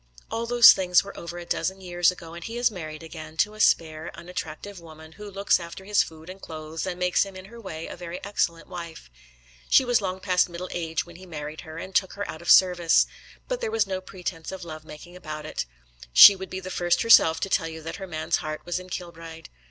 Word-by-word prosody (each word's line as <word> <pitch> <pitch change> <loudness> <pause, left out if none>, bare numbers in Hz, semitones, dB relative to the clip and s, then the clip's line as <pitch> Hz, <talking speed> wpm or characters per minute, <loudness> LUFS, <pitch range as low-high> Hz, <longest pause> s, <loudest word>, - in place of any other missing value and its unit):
All 230 +1 -2
those 240 -1 +9
things 180 -1 +3
were 200 - -10
over 170 +1 -7
a 175 - -7
dozen 190 +2 -2
years 175 -2 +2
ago, 170 -2 -7
and 170 0 -8
he 230 +5 -6
is 240 -1 +2
married 155 -5 -7
again, 160 -1 -10
to 210 +6 +2
a 215 - -13
spare, 160 -5 +2
unattractive 175 +2 -7
woman, 160 -1 -13
who 210 +5 -10
looks 200 0 +2
after 170 +2 -9
his 205 0 +3
food 160 0 -7
and 190 +1 -10
clothes, 160 +2 -6
and 180 -1 -3
makes 180 0 +2
him 195 -1 -9
in 185 0 -9
her 235 +4 -12
way 165 -6 -6
a - - -7
very 175 0 -7
excellent 170 -5 -1
wife. 170 - -9 0.6
She 265 - +6
was 245 -3 +2
long 185 -1 -3
past 185 -1 +2
middle 175 +1 -7
age 165 -2 -2
when 170 -1 -13
he 185 +1 -13
married 150 -2 -7
her 160 0 -10
and 190 +3 -7
took 190 0 +1
her 205 0 -5
out 160 - -7
of 170 - -6
service. 180 -3 +6 0.4
But - - -3
there 465 - -1
was 450 0 +1
no 190 -1 -3
pretence 180 -3 -6
of 190 -1 -7
love 155 -2 -8
making 155 +4 -12
about 155 -3 -7
it. 105 - -4 0.4
She 130 - +11
would 190 0 -8
be 185 - -5
the 185 0 -7
first 175 +2 +1
herself 165 -8 +6
to 195 - -1
tell 165 - +1
you 160 -1 -8
that 165 - -6
her 190 -1 -7
man's 160 -1 -1
heart 155 0 -5
was 175 +1 -2
in 185 0 -12
Kilbride. 165 -2 -8
175 Hz, 240 wpm, -25 LUFS, 160-190 Hz, 0.6 s, She